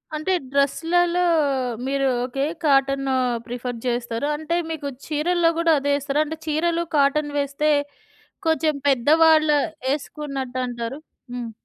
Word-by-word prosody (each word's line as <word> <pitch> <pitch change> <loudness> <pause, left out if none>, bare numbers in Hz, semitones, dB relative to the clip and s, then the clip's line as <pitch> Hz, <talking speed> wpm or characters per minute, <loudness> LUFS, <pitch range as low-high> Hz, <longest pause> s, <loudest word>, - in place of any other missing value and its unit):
అంటే 310 +5 -1 0.2
డ్రెస్లల్లో 340 +5 +2 0.7
మీరు 275 0 +1 0.2
okay, 270 +2 -2 0.2
cotton 275 -1 +2 0.4
prefer 245 -1 -5
చేస్తారు. 240 +1 -2
అంటే 315 +2 -2 0.2
మీకు 300 -3 -4 0.2
చీరల్లో 330 +3 +2
కూడా 335 -1 +3
అదే 285 +1 0
ఏస్తారా? 285 +1 0
అంటే 320 +1 -6
చీరలు 335 +2 0
కాటన్ 290 +1 +2
వేస్తే 280 +2 0 0.8
కొంచెం 315 -1 +2
పెద్దవాళ్లు 310 +3 +4 0.3
వేసుకున్నట్టు 275 -2 -3
అంటారు. 240 +3 -5 0.3
హ్మ్. 240 -2 -5
285 Hz, 115 wpm, -23 LUFS, 270-315 Hz, 0.8 s, పెద్దవాళ్లు